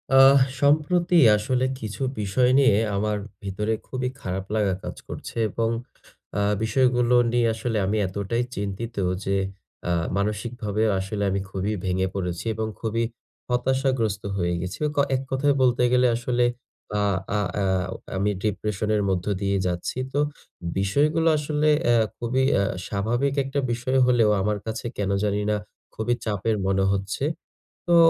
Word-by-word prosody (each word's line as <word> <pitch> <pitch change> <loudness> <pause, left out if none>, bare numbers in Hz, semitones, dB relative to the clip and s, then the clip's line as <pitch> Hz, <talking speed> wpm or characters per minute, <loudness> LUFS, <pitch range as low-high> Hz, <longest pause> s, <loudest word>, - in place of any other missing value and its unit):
আহ 135 +1 +8 0.2
সম্প্রতি 170 +5 +3 0.2
আসলে 125 +5 0 0.2
কিছু 110 +2 -6 0.2
বিষয় 125 +5 +2
নিয়ে 130 -7 +5 0.2
আমার 105 +1 0 0.3
ভিতরে 105 +3 -1
খুবই 130 -1 -2
খারাপ 95 +1 -3
লাগা 105 -3 +2
কাজ - - -5
করছে - - -7
এবং 115 +3 0 0.7
আ - - +2 0.2
বিষয়গুলো 125 +1 +3 0.2
নিয়ে 120 -1 +3
আসলে 115 0 -2
আমি 105 +3 0
এতটাই 100 +5 -1
চিন্তিত 100 +4 -4 0.3
যে, 100 0 +1 0.5
আ - - +2 0.3
মানসিকভাবে 105 +1 -1 0.2
আসলে 100 +2 -3
আমি 95 0 0
খুবই 100 +2 -2
ভেঙে 95 0 +1
পড়েছি, 90 -1 -3
এবং 110 +1 -2
খুবই 115 +1 -1 0.5
হতাশাগ্রস্ত 125 -4 0
হয়ে 85 -2 0
গেছি। 90 +3 -5 0.2
ক - - -16 0.2
এক 130 - -1
কথায় 140 +2 +2
বলতে 125 -1 +3
গেলে, 125 0 +4
আসলে 120 +1 0 0.6
আ - - +2 0.3
আ - - +1 0.2
আ - - +1 0.3
অ - - -9 0.2
আমি 100 +2 +1
ডিপ্রেশন 105 0 -1
এর 105 - +1
মধ্য 90 -1 0 0.2
দিয়ে 100 0 +1
যাচ্ছি। 90 +6 -3 0.2
তো 145 - +1 0.6
বিষয়গুলো 150 +12 +2
আসলে 150 +1 +1 0.2
অ্যা 120 - +4 0.2
খুবই 125 +3 0
অ্যা 100 - +3 0.2
স্বাভাবিক 120 +7 0
একটা 135 +1 -2
বিষয় 125 +3 0
হলেও, 120 -3 +4
আমার 105 +2 0
কাছে 110 +1 -4
কেন 100 -1 -1
জানি 105 0 +1
না, - - +2 0.4
খুবই 110 +2 0
চাপের 110 +1 0
মনে 95 0 +2
হচ্ছে। 100 +7 -2 0.6
তো 175 - +4
110 Hz, 150 wpm, -24 LUFS, 100-125 Hz, 0.7 s, আহ